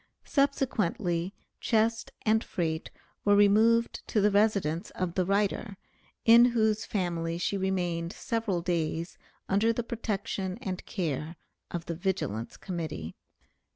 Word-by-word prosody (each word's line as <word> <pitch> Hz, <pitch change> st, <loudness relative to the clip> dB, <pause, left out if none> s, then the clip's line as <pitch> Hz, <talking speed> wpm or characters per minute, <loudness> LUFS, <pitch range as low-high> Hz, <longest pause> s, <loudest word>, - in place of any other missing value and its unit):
Subsequently 205 Hz, -, 0 dB, 0.3 s
chest 225 Hz, -1 st, +1 dB
and 220 Hz, +1 st, +3 dB
freight 160 Hz, -2 st, -2 dB, 0.3 s
were 205 Hz, 0 st, +5 dB
removed 220 Hz, +3 st, +4 dB
to 215 Hz, -, +1 dB
the 205 Hz, +1 st, +4 dB
residence 200 Hz, -6 st, +2 dB
of 180 Hz, -2 st, -2 dB
the 185 Hz, -1 st, +1 dB
writer, 200 Hz, 0 st, 0 dB, 0.5 s
in 235 Hz, +1 st, +8 dB
whose 220 Hz, -2 st, +2 dB
family 170 Hz, -4 st, -2 dB
she 175 Hz, +3 st, -1 dB
remained 175 Hz, -3 st, -1 dB
several 225 Hz, -7 st, -2 dB
days 170 Hz, -1 st, -2 dB, 0.3 s
under 205 Hz, +4 st, +3 dB
the 235 Hz, +1 st, -2 dB
protection 205 Hz, -4 st, -3 dB
and 190 Hz, -7 st, -4 dB
care 160 Hz, -3 st, -3 dB, 0.3 s
of 170 Hz, -1 st, -4 dB
the 170 Hz, -, -3 dB
Vigilance 160 Hz, -, -2 dB
Committee. 155 Hz, -, -5 dB
190 Hz, 120 wpm, -29 LUFS, 170-220 Hz, 0.5 s, in